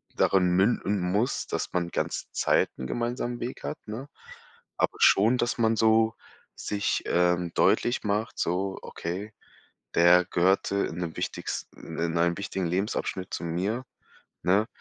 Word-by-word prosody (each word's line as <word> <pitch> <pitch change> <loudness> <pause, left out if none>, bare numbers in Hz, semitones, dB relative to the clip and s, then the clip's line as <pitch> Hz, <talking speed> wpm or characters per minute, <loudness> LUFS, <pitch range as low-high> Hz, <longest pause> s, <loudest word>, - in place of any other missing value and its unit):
darin 90 -2 +3
münden 100 +1 +2
muss, 100 +8 0
dass - - -3
man 85 -1 0
ganze - - -2
Zeit - - +2
'n 65 - -5
gemeinsamen 120 - -2
Weg 120 +2 -5
hat, 150 - -4
ne? 120 +7 -6 0.7
Aber - - +1
schon, 110 +6 +5
dass 120 +1 0
man 115 0 +3
so 110 0 +4 0.4
sich, 100 -1 -1
ähm, 90 0 +2
deutlich 120 - +2
macht, 105 +2 -1
so: 95 +3 -1
„Okay, 95 +5 -5 0.6
der 90 +1 +6
gehörte 95 +2 +2
in - - -7
'nem 85 -2 -4
wichtigsten - - -5
in 85 0 0
einem 85 +1 +2
wichtigen 95 -2 -3
Lebensabschnitt 95 0 -2
zu - - -3
mir“, 95 +10 -2 0.6
ne? 100 +5 +3
95 Hz, 140 wpm, -27 LUFS, 90-110 Hz, 0.7 s, der